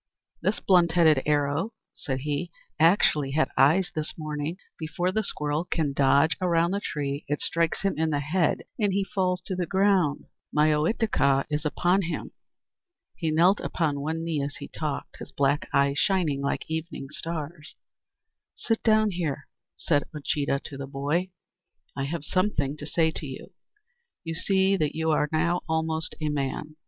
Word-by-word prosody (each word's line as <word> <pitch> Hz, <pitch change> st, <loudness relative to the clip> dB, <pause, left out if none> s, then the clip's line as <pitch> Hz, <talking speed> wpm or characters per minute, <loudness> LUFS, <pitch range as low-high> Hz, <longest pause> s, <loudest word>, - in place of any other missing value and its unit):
"This -, -, 0 dB
blunt 175 Hz, -3 st, +4 dB
headed 160 Hz, -5 st, +5 dB
arrow," 150 Hz, +8 st, +1 dB, 0.2 s
said 130 Hz, -2 st, -4 dB
he, 150 Hz, +4 st, -2 dB, 0.3 s
"actually 155 Hz, -5 st, +4 dB
had 155 Hz, -, +1 dB
eyes 175 Hz, +7 st, +4 dB
this 155 Hz, -1 st, -4 dB
morning. 155 Hz, +1 st, -4 dB, 0.2 s
Before 165 Hz, +3 st, -1 dB
the 220 Hz, -, +1 dB
squirrel 150 Hz, -5 st, -1 dB
can 155 Hz, -5 st, -1 dB
dodge 140 Hz, +3 st, +4 dB
around 170 Hz, -1 st, +2 dB
the 200 Hz, -, 0 dB
tree 145 Hz, -6 st, -3 dB
it 145 Hz, -, -1 dB
strikes 165 Hz, +2 st, 0 dB
him 195 Hz, -4 st, 0 dB
in 160 Hz, 0 st, +2 dB
the 145 Hz, -2 st, 0 dB
head, 160 Hz, +4 st, +1 dB, 0.2 s
and, 210 Hz, -, +3 dB
as -, -, -1 dB
he 200 Hz, -, +2 dB
falls 185 Hz, -2 st, -1 dB
to 190 Hz, -, -4 dB
the 180 Hz, -1 st, -2 dB
ground, 190 Hz, -5 st, +2 dB, 0.3 s
my 150 Hz, +1 st, +4 dB
Ohitika 150 Hz, -, +2 dB
is 150 Hz, +1 st, -1 dB
upon 175 Hz, +5 st, +2 dB
him." 175 Hz, -2 st, -4 dB, 0.8 s
He 165 Hz, -, -2 dB
knelt 175 Hz, +6 st, +4 dB
upon 150 Hz, -4 st, -1 dB
one 160 Hz, +3 st, -2 dB
knee 165 Hz, -3 st, -1 dB
as 140 Hz, +1 st, -3 dB
he -, -, -7 dB
talked, 150 Hz, -3 st, -5 dB
his -, -, -9 dB
black 140 Hz, +1 st, +1 dB
eyes 140 Hz, 0 st, +2 dB
shining 170 Hz, -8 st, +1 dB
like 140 Hz, -, -1 dB
evening 160 Hz, -3 st, -4 dB
stars. 155 Hz, 0 st, -6 dB, 0.8 s
"Sit 225 Hz, -1 st, -1 dB
down 215 Hz, -1 st, +4 dB
here," 155 Hz, -6 st, -3 dB, 0.3 s
said 145 Hz, -3 st, +1 dB
Uncheedah 140 Hz, -1 st, -1 dB
to 140 Hz, -, -8 dB
the 135 Hz, 0 st, -6 dB
boy; 145 Hz, +7 st, -1 dB, 0.7 s
"I 135 Hz, -, -2 dB
have 150 Hz, +1 st, -4 dB
something 150 Hz, -8 st, 0 dB
to 150 Hz, -, -7 dB
say 160 Hz, +1 st, +2 dB
to 155 Hz, -, -6 dB
you. 135 Hz, +8 st, -9 dB, 0.7 s
You 165 Hz, -1 st, -4 dB
see 190 Hz, +3 st, +2 dB
that 155 Hz, -4 st, -1 dB
you 160 Hz, 0 st, +1 dB
are 150 Hz, -1 st, +2 dB
now 170 Hz, +3 st, +1 dB
almost 160 Hz, 0 st, -1 dB
a 155 Hz, -1 st, -1 dB
man. 150 Hz, +1 st, -3 dB
160 Hz, 170 wpm, -26 LUFS, 145-175 Hz, 0.8 s, headed